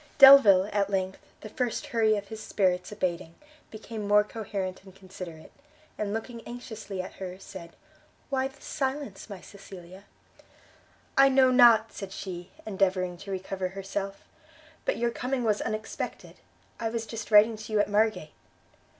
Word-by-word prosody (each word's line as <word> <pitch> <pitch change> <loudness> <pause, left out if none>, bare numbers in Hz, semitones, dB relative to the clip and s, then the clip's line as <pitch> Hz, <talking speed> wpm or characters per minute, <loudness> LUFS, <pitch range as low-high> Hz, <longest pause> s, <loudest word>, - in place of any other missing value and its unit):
Delvile, 265 -9 +9
at 200 -1 +1
length, 190 -1 -2 0.2
the 215 - -8
first 245 +5 -2
hurry 220 -2 +3
of 200 -1 -7
his 220 -1 -7
spirits 180 -2 0
abating, 175 -4 -3 0.3
became 215 -1 -7
more 210 0 +5
coherent 200 -4 -5
and 190 -1 -15
considerate: 185 -4 -10 0.4
and 205 -1 -3
looking 230 +2 -5
anxiously 220 -5 -6
at - - -9
her, 185 -1 -5
said, 190 -3 -11 0.6
"Why 265 -1 +1
this 270 - -17
silence, 265 -7 -4
my 195 -3 -8
Cecilia?" 190 -1 -12 1.1
"I 275 0 +7
know 260 -1 +5
not!" 235 -3 +6
said 195 -2 -7
she, 180 -2 -7 0.2
endeavouring 185 -3 0
to 200 +3 -11
recover 190 0 -3
herself, 195 +1 -5 0.6
"but - - 0
your 235 0 0
coming 250 +1 -2
was 215 -2 +1
unexpected: 215 0 -5 0.4
I 225 - -1
was 225 0 -3
just 225 -1 -7
writing 215 +1 +6
to 215 +1 -9
you 215 - +2
at 205 - +3
Margate." 210 -5 +1
205 Hz, 150 wpm, -28 LUFS, 190-225 Hz, 1.1 s, Delvile